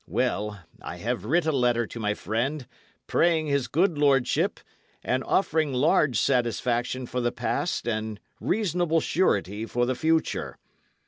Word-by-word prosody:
Well, 105 -5 -1 0.2
I - - -7
have - - -3
writ 165 +7 +2
a 160 - +2
letter 120 -4 +2
to 115 - -9
my 105 -1 0
friend, 125 +7 -2 0.4
praying 165 -2 +2
his 140 -3 0
good 170 0 +1
lordship, 135 -3 +2 0.4
and 130 +1 0
offering 160 -6 +1
large 130 -2 +3
satisfaction 125 0 0
for 125 +1 -3
the 120 0 +1
past - - -2
and 110 -2 -2 0.2
reasonable 175 -5 +1
surety 110 - 0
for 120 +1 0
the 130 - 0
future. 160 +4 0
130 Hz, 140 wpm, -26 LUFS, 120-155 Hz, 0.4 s, large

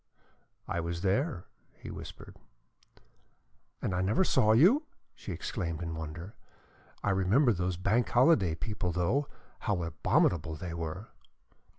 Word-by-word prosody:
"I 85 - -2
was 85 0 -3
there," 100 - 0 0.3
he - - -8
whispered. - - -10 1.5
"And 95 - 0
I 90 - 0
never 105 - +2
saw 125 - +3
you!" 215 - +5 0.3
she - - -8
exclaimed 85 -6 -3
in 85 -1 -4
wonder. 80 +5 -7 0.7
"I 105 - +2
remember 105 +7 +3
those 90 -1 -2
Bank 105 +6 +1
Holiday 120 - +4
people, 90 +2 -3
though, 90 - +1 0.3
how 100 -6 -1
abominable 80 0 +1
they 85 +2 -6
were." 85 +5 -5
95 Hz, 125 wpm, -30 LUFS, 85-115 Hz, 1.5 s, you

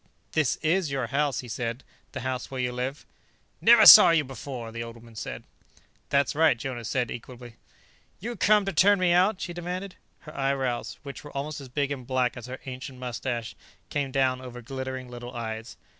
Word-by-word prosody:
"This 155 -5 +1
is 165 +1 +2
your 135 -3 -1
house?" 140 +3 0
he 125 - -11
said. 115 +2 -4 0.3
"The 130 - -5
house 130 0 -3
where 130 - -5
you 125 -1 0
live?" 125 +3 -4 0.6
"Never 230 -1 +7
saw 210 - +12
you 165 -2 +4
before," 130 -3 -7
the 115 +1 -6
old 115 0 -7
woman 115 -1 -15
said. 105 - -6 0.7
"That's 140 0 +2
right," 155 -4 +4
Jonas 120 -3 -5
said 125 -3 -1
equably. 120 -1 -9 0.6
"You 235 +4 -5
come 210 +1 +4
to 195 - -2
turn 205 +1 +5
me 180 -2 +2
out?" 185 +3 +3
she 175 - -5
demanded. 180 +2 -5 0.3
Her 155 - -12
eyebrows 135 -3 -1
which 140 -1 -8
were 145 -1 -9
almost 145 +1 -4
as 135 - -10
big 140 +2 -1
and 130 -4 -5
black 130 -2 0
as 120 0 -8
her 130 +1 -7
ancient 130 0 -7
mustache 120 -2 -4 0.4
came 145 -2 -1
down 130 -1 +1
over 125 -1 -9
glittering 130 0 -5
little 120 0 -9
eyes. 110 -1 -6
130 Hz, 190 wpm, -27 LUFS, 125-150 Hz, 0.7 s, saw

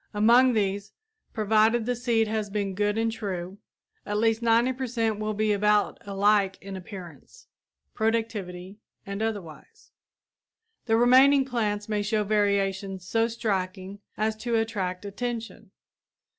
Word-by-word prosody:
Among 240 +4 +5
these, 200 -1 -1 0.4
provided 220 +1 +2
the 245 +1 0
seed 230 -2 +1
has 215 -1 -2
been 200 -1 -2
good 205 +2 0
and 225 0 +1
true, 195 -3 -5 0.4
at 205 - -3
least 225 +1 +2
90 235 +2 +3
per 260 0 -4
cent 225 -3 -1
will 215 0 -2
be 215 0 +1
about 210 0 +2
alike 200 -1 +2
in 195 0 -8
appearance, 190 - -11 0.5
productivity 210 -4 -2 0.3
and 200 +1 -5
otherwise. 195 -9 -6 1.0
The 225 0 +3
remaining 260 +3 +6
plants 210 -5 -2
may 210 -1 -1
show 210 +1 0
variations 195 -2 0
so 225 +3 +2
striking 195 -4 -3 0.2
as 215 +1 0
to 235 +1 -2
attract 205 -4 -2
attention. 230 +3 -5
215 Hz, 130 wpm, -26 LUFS, 200-225 Hz, 1.0 s, remaining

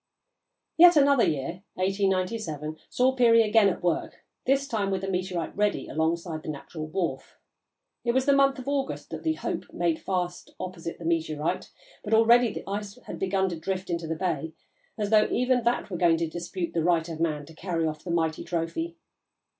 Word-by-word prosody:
Yet 345 0 +8
another 280 -3 +5
year 155 +5 -1
1897 185 -5 -1
saw 255 +1 +3
Peary 235 -3 +5
again 215 -1 +5
at 185 - -4
work, 175 -2 -2 0.2
this 275 +1 +2
time 210 -5 -1
with 190 -1 -1
the 195 - -4
meteorite 180 -3 -2
ready 210 0 0
alongside 160 +1 -1
the - - -7
natural 155 +2 -6
wharf. 155 -5 -3 0.7
It 235 - +2
was 260 +1 +2
the 280 - +5
month 275 0 +4
of 255 0 -8
August 280 -1 -2
that - - -5
the 320 - +1
Hope - - -4
made 170 -2 0
fast 180 -2 -3
opposite 175 -2 -6
the 170 - -9
meteorite, 160 0 -1 0.3
but 215 +1 +2
already 235 +1 +5
the - - -7
ice 205 +2 -4
had - - -7
begun 190 0 +1
to 170 -2 -5
drift 185 +2 -3
into 170 -1 -2
the 160 - -2
bay, 160 -3 -2 0.4
as 210 -1 -2
though 215 -1 +5
even 250 0 +2
that 235 -3 0
were 180 - -2
going 170 -1 +4
to 165 0 -1
dispute 175 +2 -4
the 165 - 0
right 170 -1 +2
of 165 -2 -6
man 155 -3 -1
to 160 - -14
carry 165 -1 -2
off 155 -1 -3
the - - -7
mighty 160 -2 0
trophy. 180 - -3
185 Hz, 190 wpm, -27 LUFS, 165-225 Hz, 0.7 s, Yet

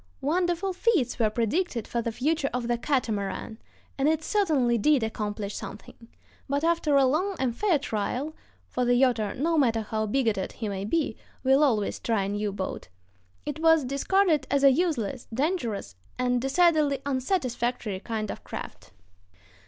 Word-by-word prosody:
Wonderful 350 +5 0
feats 360 - +1
were 220 -2 +3
predicted 235 - -1
for 235 - -1
the 230 0 -2
future 280 +4 0
of 245 -2 -2
the 240 - +2
catamaran, 225 -4 -2 0.4
and 275 +3 +3
it 320 0 0
certainly 295 - +2
did 280 +2 +3
accomplish 210 -2 -3
something; 220 +3 -9 0.4
but 280 +2 0
after 330 -3 +2
a 275 -1 +6
long 360 +9 +1
and 250 -5 -1
fair 390 - +2
trial 255 +6 -3 0.3
(for 250 - -2
the 245 0 +3
yachter, 235 -6 +2
no 320 +4 +2
matter 230 -5 +2
how 215 0 -2
bigoted 220 -5 0
he 225 - -4
may 195 -1 -3
be, 285 0 0 0.3
will 270 +3 +4
always 220 -8 +1
try 225 -4 0
a 195 - -2
new 205 0 -1
boat) 190 -1 -5 0.6
it 295 +1 -4
was 325 -3 +4
discarded 300 +2 +2
as 280 0 +1
a 275 - +8
useless, 270 - -1
dangerous, 235 - -2 0.2
and 250 -1 +1
decidedly 300 0 +3
unsatisfactory 250 - -1
kind 215 0 -3
of - - -9
craft.... - - -8
260 Hz, 160 wpm, -27 LUFS, 220-310 Hz, 0.6 s, a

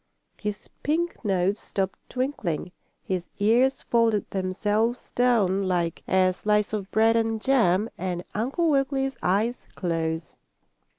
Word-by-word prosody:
His 210 -1 -4
pink 335 +1 -1
nose 195 0 +1
stopped 190 -1 -3
twinkling, 235 - -2 0.3
his 180 -2 -3
ears 240 +6 +3
folded 230 -3 +2
themselves 205 +5 -1
down 200 -6 +2
like 170 -3 0
a 185 -1 +3
slice 210 +2 +1
of 200 -2 -3
bread 225 +1 +4
and 225 -1 +1
jam, 215 -6 +3
and 180 -1 -2
Uncle 265 +10 0
Wiggily's 270 -1 +1
eyes 215 +6 0
closed. 165 -2 -2
210 Hz, 120 wpm, -26 LUFS, 185-240 Hz, 0.3 s, bread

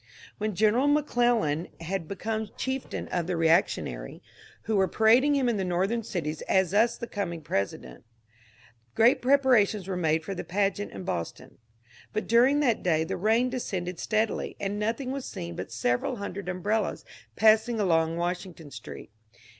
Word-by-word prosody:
When 215 -1 -2
General 220 +7 +3
McClellan 240 - +1
had 165 0 -4
become 220 +3 -3
chieftain 260 0 -3
of 175 -2 -2
the 180 -2 -1
reactionary, 160 - 0 0.4
who 220 - -1
were 190 -1 +3
parading 235 - +4
him 270 -3 +1
in 235 -3 +1
the 195 - -1
Northern 190 +6 0
cities 160 -7 -4
as 190 -3 +3 0.3
the - - -5
coming 180 -7 -4
President, 100 - -3 0.9
great 235 +4 +4
preparations 245 -7 +3
were 190 - -2
made 160 -2 +1
for 195 - -3
the 185 - -5
pageant 200 +2 -1
in - - -8
Boston; 85 - -5 0.5
but 215 - -2
during 255 +6 +4
that 245 -6 +2
day 160 -3 +2
the 160 - -3
rain 225 +6 +2
descended 185 -8 -4
steadily, 215 0 -1
and 200 +1 -3
nothing 230 +5 -2
was 275 -1 -4
seen 85 0 -6
but 95 +4 -6
several 120 - 0
hundred 200 -3 -6
umbrellas 205 +5 -1 0.3
passing 220 +1 +4
along 165 -4 +2
Washington 175 -3 -4
Street. - - -10
200 Hz, 155 wpm, -27 LUFS, 170-230 Hz, 0.9 s, parading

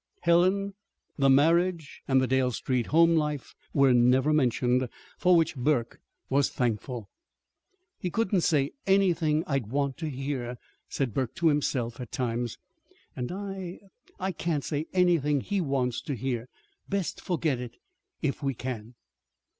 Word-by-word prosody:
Helen, 185 +4 +3 0.5
the 135 0 +4
marriage, 165 +3 +3
and 130 -1 +4
the 130 - +2
Dale 130 0 +2
Street 125 0 -1
home 165 +2 +5
life 150 -3 -1 0.2
were 135 -2 +4
never 125 +5 +4
mentioned 125 -2 +2 0.3
for 180 0 +5
which 165 -2 +2
Burke 125 -2 0 0.3
was 140 +1 +2
thankful. 120 -1 -2 0.9
"He 180 - -2
couldn't 195 -1 +1
say 145 -4 +2 0.2
anything 170 -5 +3
I'd 135 -7 -1
want 140 +2 -1
to 160 -2 -3
hear," 130 -3 -4 0.3
said 130 -6 -2
Burke 130 -1 -2
to 170 -3 +3
himself, 130 -5 -1
at 125 - -8
times. 120 -1 -2 0.6
"And 125 -1 -4
I 190 -2 -5 0.4
I 190 +1 -1
can't 160 -4 -2
say 150 +1 -2
anything 170 -6 +3
he 200 +4 -1
wants 130 -5 -1
to 145 -4 -4
hear. 120 0 -3 0.4
Best 200 -3 -2
forget 160 -7 0
it 120 -1 -7 0.5
if 145 0 -1
we 135 -2 -1
can." 120 -1 -6
140 Hz, 145 wpm, -28 LUFS, 125-170 Hz, 0.9 s, home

